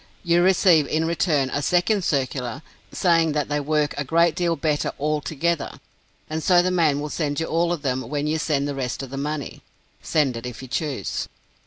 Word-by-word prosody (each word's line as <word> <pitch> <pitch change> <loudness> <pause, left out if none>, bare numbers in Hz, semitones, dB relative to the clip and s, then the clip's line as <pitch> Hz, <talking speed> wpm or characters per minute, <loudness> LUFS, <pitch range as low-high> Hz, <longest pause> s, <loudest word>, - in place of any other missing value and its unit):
You 170 -1 +3
receive 175 -4 +4
in 160 +3 0
return 155 -5 +1
a 145 - -1
second 180 +6 +2
circular, 130 -3 -2 0.3
saying 165 -3 +2
that 150 -1 -1
they 145 0 0
work 150 0 0
a - - 0
great 165 +3 +3
deal 170 -1 0
better 150 -3 -1
all 150 +1 0
together, 165 +2 -2 0.5
and 160 +1 -3
so 175 +1 +4
the 185 - +1
man 160 -5 +2
will 150 +1 -4
send 145 -2 -1
you 165 - -1
all 170 +2 +1
of 170 -4 -3
them 130 -3 -2
when 145 0 -2
you 155 +1 0
send 145 -2 0
the 145 - -2
rest 135 -1 -3
of 130 - -8
the 135 - -5
money. 145 0 -4 0.4
Send 145 -6 +1
it, 115 +2 -5
if 125 +1 -8
you - - -8
choose! 135 - -3
150 Hz, 205 wpm, -23 LUFS, 140-170 Hz, 0.5 s, receive